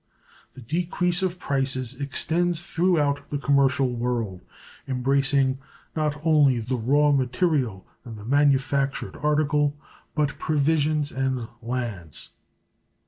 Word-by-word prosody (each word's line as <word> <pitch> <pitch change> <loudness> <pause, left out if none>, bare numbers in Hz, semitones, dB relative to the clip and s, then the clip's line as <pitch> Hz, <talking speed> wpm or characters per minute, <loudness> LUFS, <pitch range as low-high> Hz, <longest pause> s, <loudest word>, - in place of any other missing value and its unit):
The 130 - -11
decrease 175 - 0
of 185 -1 -1
prices 135 -4 -1
extends 165 +4 0
throughout 165 -5 +1
the 145 - -2
commercial 140 -2 +2
world, 115 -6 -2 0.5
embracing 135 +1 +1 0.4
not 150 -2 -1
only 145 -6 +4
the 120 +3 -2
raw 145 +5 +3
material 130 - 0 0.2
and 115 -2 -9
the 105 - -10
manufactured 140 0 +1
article, 150 -1 +1 0.4
but 150 -2 0
provisions 150 0 +1
and 130 -3 -2
lands. 115 -10 -4
140 Hz, 105 wpm, -25 LUFS, 130-150 Hz, 0.5 s, only